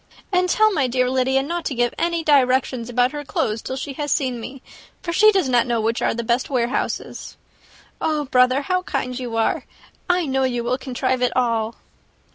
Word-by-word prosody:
And 365 0 +2
tell 435 +2 +4
my 275 -7 +1
dear 250 0 +1
Lydia 265 +1 +2
not 340 +4 -3
to 275 - -2
give 240 0 +1
any 340 -1 -1
directions 255 -4 +2
about 245 +1 +2
her 295 -1 -5
clothes 220 -5 -2
till 260 - -5
she 275 +1 -5
has 290 -1 -2
seen 255 -4 0
me, 255 +3 -9 0.4
for 340 - -3
she 430 +4 +6
does 380 -8 +1
not 245 -1 +2
know 235 -1 0
which 225 +2 -1
are - - +1
the 235 - -3
best 235 +2 0
warehouses. 250 -1 -2 0.6
Oh, 305 -2 0
brother, 255 +1 +3
how 365 +5 0
kind 260 -7 -3
you 240 -3 -5
are! 225 - +1 0.5
I 360 -1 +2
know 265 -1 0
you 245 -2 -1
will 250 +2 -1
contrive 255 -1 -2
it 250 - +1
all." 230 -2 0
260 Hz, 200 wpm, -21 LUFS, 245-290 Hz, 0.6 s, she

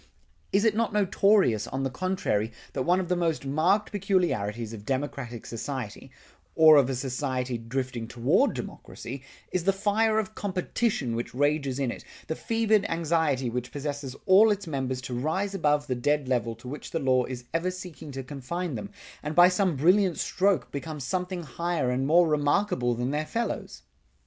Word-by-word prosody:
Is 200 +3 +3
it 220 -2 +3
not 230 -1 0
notorious, 195 - +3
on 135 +1 -3
the 135 - -1
contrary, 130 - -1 0.2
that - - -2
one 175 +7 +3
of 185 - -2
the 180 - +1
most 165 -5 -1
marked 170 +9 +2
peculiarities 140 - 0
of 105 -2 -8
democratic 130 -2 -3
society, 120 -2 -5 0.5
or 155 -1 +8
of 135 -2 +4
a 135 - -1
society 130 -1 -2
drifting 120 0 -4
toward 120 +1 +2
democracy, 130 +3 -7 0.3
is 180 -2 -1
the 195 - +5
fire 215 +3 +1
of 220 -1 -1
competition 190 - -1
which 120 +1 -4
rages 145 -1 +1
in 135 -3 0
it, - - -8 0.2
the 160 - -3
fevered 220 -1 +2
anxiety 160 -5 +1
which 125 +1 -3
possesses 145 -2 -4
all 200 +4 +7
its 205 -1 0
members 130 -4 -2
to 125 0 -6
rise 160 +11 -1
above 150 -5 +1
the 130 - -1
dead 145 +3 0
level 120 -3 0
to 115 +3 -13
which 145 +4 -7
the - - -2
law 130 -4 +2
is 125 -1 -6
ever 165 +2 +1
seeking 180 -5 -8
to 135 0 -5
confine 150 +6 -4
them, 200 - -5 0.3
and 150 +1 -4
by 175 +2 +8
some 185 -2 +1
brilliant 180 +5 +3
stroke 190 -8 +1
become 150 +2 -5
something 180 +6 -3
higher 160 -1 -1
and 130 +2 0
more 170 +3 +5
remarkable 145 - +1
than 125 +3 -2
their 150 +1 -1
fellows? 230 -2 -3
150 Hz, 175 wpm, -27 LUFS, 130-185 Hz, 0.5 s, or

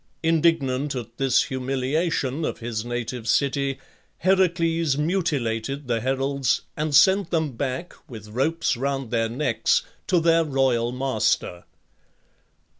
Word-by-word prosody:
Indignant 150 -4 +1
at 120 -2 -7
this 135 -2 +3
humiliation 135 +3 -1
of - - -2
his 115 -2 -4
native 120 -1 -4
city, 140 -1 +1 0.4
Heracles 170 -5 +2
mutilated 140 - -1
the 115 -2 0
heralds, 135 +1 0
and 150 -1 -1
sent 190 +3 +5
them 160 -3 0
back, 130 +6 -4 0.2
with 110 -4 -10
ropes 140 +8 0
round 135 -1 -3
their 115 -1 +1
necks, 125 0 +1 0.2
to 180 - +3
their 165 0 +4
royal 130 -5 +1
master. 110 -8 -1
135 Hz, 115 wpm, -24 LUFS, 120-160 Hz, 0.4 s, sent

